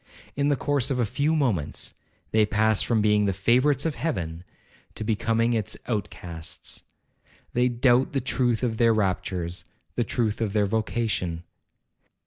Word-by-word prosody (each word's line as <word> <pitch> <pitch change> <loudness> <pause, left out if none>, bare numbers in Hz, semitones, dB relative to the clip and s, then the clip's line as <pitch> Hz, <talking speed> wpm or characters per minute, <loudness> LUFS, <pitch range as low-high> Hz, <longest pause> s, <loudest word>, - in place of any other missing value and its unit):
In 140 0 +1
the 145 - +3
course 140 0 0
of 135 - 0
a 120 - +3
few 145 +9 0
moments, 115 - -1 0.4
they 110 0 +4
pass 105 0 +2
from 110 -3 +1
being 105 -1 +3
the 100 - +1
favourites 130 - +3
of 160 - +1
Heaven 85 - -3 0.5
to - - -4
becoming 115 +2 +1
its 110 -4 -1
outcasts. 90 -7 -4 0.7
They 125 +1 +3
doubt 120 +1 +3
the 135 - +2
truth 125 -2 0
of 115 -3 0
their 115 -1 +4
raptures,—the 90 -1 -2
truth 110 -2 -1
of 105 -3 -1
their 105 -1 +3
vocation. 105 -5 -1
110 Hz, 145 wpm, -26 LUFS, 100-125 Hz, 0.7 s, they